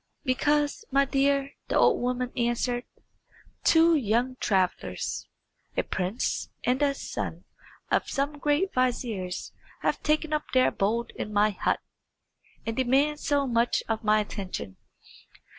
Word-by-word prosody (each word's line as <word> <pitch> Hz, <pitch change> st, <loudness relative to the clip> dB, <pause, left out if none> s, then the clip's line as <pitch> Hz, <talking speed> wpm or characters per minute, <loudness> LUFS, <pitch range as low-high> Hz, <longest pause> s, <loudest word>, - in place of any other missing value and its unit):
"Because, 295 Hz, +5 st, +1 dB
my 275 Hz, +1 st, +4 dB
dear," 275 Hz, 0 st, +1 dB, 0.2 s
the -, -, +1 dB
old -, -, +4 dB
woman 250 Hz, 0 st, -1 dB
answered, 240 Hz, 0 st, 0 dB, 0.8 s
"two 330 Hz, +1 st, +6 dB
young 245 Hz, 0 st, +1 dB
travellers, 190 Hz, -6 st, -1 dB, 0.5 s
a -, -, +3 dB
prince 190 Hz, +6 st, -2 dB
and 250 Hz, +1 st, +2 dB
the 285 Hz, -1 st, +2 dB
son -, -, -5 dB, 0.5 s
of -, -, +2 dB
some 285 Hz, +2 st, -1 dB
great 295 Hz, +7 st, +1 dB
vizier, 240 Hz, -7 st, 0 dB, 0.5 s
have -, -, +1 dB
taken 305 Hz, 0 st, +1 dB
up 300 Hz, -, 0 dB
their 255 Hz, -, +5 dB
abode 230 Hz, +4 st, -1 dB
in 210 Hz, -, -4 dB
my 210 Hz, +1 st, +3 dB
hut, 195 Hz, -, 0 dB, 0.8 s
and 225 Hz, -, -2 dB
demand 275 Hz, +4 st, +2 dB
so 285 Hz, -2 st, +1 dB
much 235 Hz, -1 st, +1 dB
of 225 Hz, 0 st, -2 dB
my 215 Hz, 0 st, +4 dB
attention. 190 Hz, -, -6 dB
255 Hz, 130 wpm, -27 LUFS, 225-285 Hz, 0.8 s, two